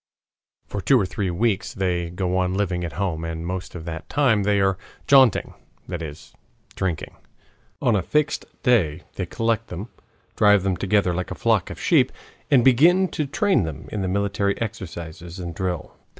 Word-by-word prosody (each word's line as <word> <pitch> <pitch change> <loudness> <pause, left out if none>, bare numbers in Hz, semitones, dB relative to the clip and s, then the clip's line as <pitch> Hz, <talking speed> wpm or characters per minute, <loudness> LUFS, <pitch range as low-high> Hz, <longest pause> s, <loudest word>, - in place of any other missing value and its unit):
For 100 - -5
two 125 +8 +4
or 100 - +1
three 95 +1 -2
weeks 100 +3 0
they 90 -3 -1
go 90 +1 -2
on 90 0 0
living 90 -3 -1
at 85 -4 -4
home, 85 -1 -2
and 80 0 -4
most 90 +1 -5
of 80 -2 -7
that 80 -1 -6
time 125 -7 +3
they 100 0 +2
are 95 -1 +3 0.3
"jaunting," 135 -5 +5 0.3
that 90 -2 -4
is, 75 -2 -9 0.4
drinking. 90 -5 -3 0.7
On 120 - +3
a 100 - +2
fixed 150 - 0 0.2
day 90 - +2
they - - -4
collect 115 0 -1
them, 95 +7 -7 0.5
drive 105 -2 +5
them 95 -2 +1
together 100 -1 +1
like 90 +1 -3
a - - -5
flock - - +1
of - - -8
sheep, - - +3 0.4
and 130 -5 +5
begin 170 +9 +5
to 150 - -2
train 190 - +2
them 80 -5 -5
in 105 - -2
the 95 - -1
military 100 +1 0
exercises 85 -6 -6
and 85 -2 -5
drill. 90 -1 -4
95 Hz, 180 wpm, -23 LUFS, 85-115 Hz, 0.7 s, jaunting